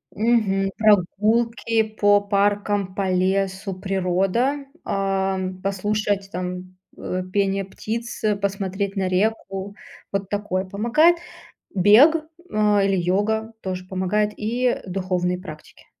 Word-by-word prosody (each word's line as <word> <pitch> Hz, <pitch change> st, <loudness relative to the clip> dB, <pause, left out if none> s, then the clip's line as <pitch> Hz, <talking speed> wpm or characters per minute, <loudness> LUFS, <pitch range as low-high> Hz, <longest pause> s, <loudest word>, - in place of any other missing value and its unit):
Мгм. 205 Hz, -4 st, +2 dB
Прогулки 220 Hz, +3 st, +2 dB
по 205 Hz, -1 st, +3 dB
паркам, 200 Hz, -1 st, 0 dB
по 195 Hz, -1 st, -1 dB
лесу, 190 Hz, +2 st, 0 dB
природа, 195 Hz, +8 st, 0 dB, 0.2 s
ам. 190 Hz, -1 st, -1 dB
Послушать 200 Hz, 0 st, -1 dB
там, 180 Hz, 0 st, -5 dB, 0.2 s
э, 185 Hz, 0 st, -3 dB
пение 195 Hz, 0 st, +1 dB
птиц, 230 Hz, +5 st, -5 dB, 0.2 s
посмотреть 195 Hz, 0 st, -2 dB
на 190 Hz, -1 st, 0 dB
реку. 195 Hz, 0 st, -1 dB, 0.4 s
Вот 195 Hz, -1 st, -2 dB
такое 200 Hz, -2 st, -2 dB
помогает. 240 Hz, -, +3 dB, 0.6 s
Бег, 215 Hz, -, +7 dB, 0.4 s
а, 210 Hz, -1 st, +3 dB
или 195 Hz, 0 st, +2 dB
йога 205 Hz, +5 st, 0 dB
тоже 185 Hz, -1 st, -4 dB
помогает, 190 Hz, +3 st, 0 dB
и 240 Hz, +3 st, 0 dB
духовные 180 Hz, -1 st, -1 dB
практики. 155 Hz, -5 st, -12 dB
195 Hz, 105 wpm, -23 LUFS, 190-215 Hz, 0.6 s, Бег